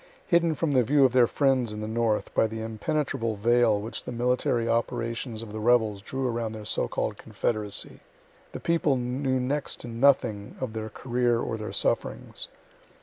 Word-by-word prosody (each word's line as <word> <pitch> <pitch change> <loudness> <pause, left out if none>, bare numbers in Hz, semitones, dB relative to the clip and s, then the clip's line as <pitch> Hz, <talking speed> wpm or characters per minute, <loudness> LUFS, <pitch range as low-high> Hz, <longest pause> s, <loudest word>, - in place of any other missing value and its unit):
Hidden 170 -2 +3
from 160 0 0
the 130 -2 +4
view 140 +4 +4
of 125 - +2
their 125 -2 +6
friends 130 -5 +2
in 105 - -6
the 110 - -4
north 110 -1 0
by 110 - +3
the 110 +1 -6
impenetrable 115 +1 -2
veil 115 0 +3
which 110 +2 -5
the - - -6
military 120 -1 +1
operations 115 0 -1
of 105 -2 -9
the 110 - -4
rebels 110 -3 +3
drew 130 +5 -3
around 115 -2 -2
the 110 -1 -8
so - - 0
called - - -2
confederacy, 105 -3 -3 0.5
the - - -6
people 165 -4 +2
knew 130 +2 -1
next 140 +3 -2
to - - -8
nothing 115 -4 +2
of 130 -4 -3
their 110 0 -4
career 120 0 0
or 115 - -2
their 110 -1 -5
sufferings. - - -2
120 Hz, 180 wpm, -27 LUFS, 110-130 Hz, 0.5 s, their